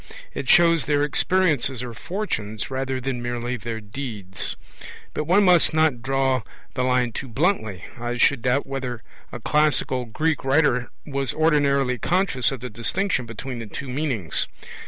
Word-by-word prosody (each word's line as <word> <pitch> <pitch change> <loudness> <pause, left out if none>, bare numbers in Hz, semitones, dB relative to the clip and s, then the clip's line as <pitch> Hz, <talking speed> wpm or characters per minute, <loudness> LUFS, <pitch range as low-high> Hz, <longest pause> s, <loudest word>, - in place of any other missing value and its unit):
It - - -4
shows 170 -2 +6
their 145 -1 +2
experiences 150 -5 +2
or 120 -2 -6
fortunes 115 - -4
rather 130 0 -2
than 130 -1 -3
merely 120 +1 -2
their 115 -1 -5
deeds. 105 -4 -5 0.6
But 150 - -2
one 185 +6 +4
must 175 -4 +5
not 155 -6 +3
draw 135 0 +1 0.3
the 130 - -1
line 125 -1 +2
too 135 - -5
bluntly. 120 - 0 0.2
I 120 +1 -3
should 130 0 +3
doubt 125 +4 +1
whether 130 -4 -4 0.3
a 120 - -6
classical 135 -2 +1
Greek 155 +7 -1
writer 135 -3 +2 0.2
was 140 -4 -2
ordinarily 140 -5 +2
conscious 170 -10 +1
of 135 -4 -5
the 125 - -5
distinction 125 - -1
between 120 +2 -6
the 115 - -6
two 130 +6 -6
meanings. 125 - -1
130 Hz, 155 wpm, -24 LUFS, 120-150 Hz, 0.6 s, shows